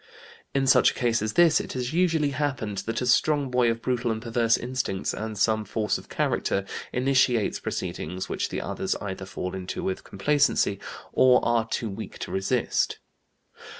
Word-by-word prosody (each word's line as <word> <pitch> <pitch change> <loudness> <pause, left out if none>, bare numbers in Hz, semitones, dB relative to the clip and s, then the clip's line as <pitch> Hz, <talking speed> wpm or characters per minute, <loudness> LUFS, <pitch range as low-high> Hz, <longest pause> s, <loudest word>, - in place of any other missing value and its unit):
In 135 -1 +2
such 135 - +6
a - - -5
case 120 -4 +1
as 110 0 -2
this 170 -2 +5
it - - -7
has 125 +2 -3
usually 165 -4 +2
happened 130 -8 -2
that 115 +1 -1
a - - -1
strong 140 +2 +2
boy 125 -1 +3
of 115 0 -2
brutal 125 -1 0
and 110 -1 -1
perverse 115 0 +2
instincts 120 -6 -2
and 110 0 -5
some 110 +1 +2
force 105 +1 -1
of - - -16
character 100 0 0 0.3
initiates 125 -4 +2
proceedings 90 +4 -4
which - - -2
the - - -3
others - - -2
either 95 -1 -6
fall 90 -1 -5
into 95 -1 -5
with 95 - -2
complacency 140 -3 +1 0.3
or 125 -1 +6
are 115 -1 +2
too 115 - -2
weak 95 - -7
to - - -6
resist. 95 0 0
115 Hz, 175 wpm, -26 LUFS, 105-130 Hz, 0.3 s, such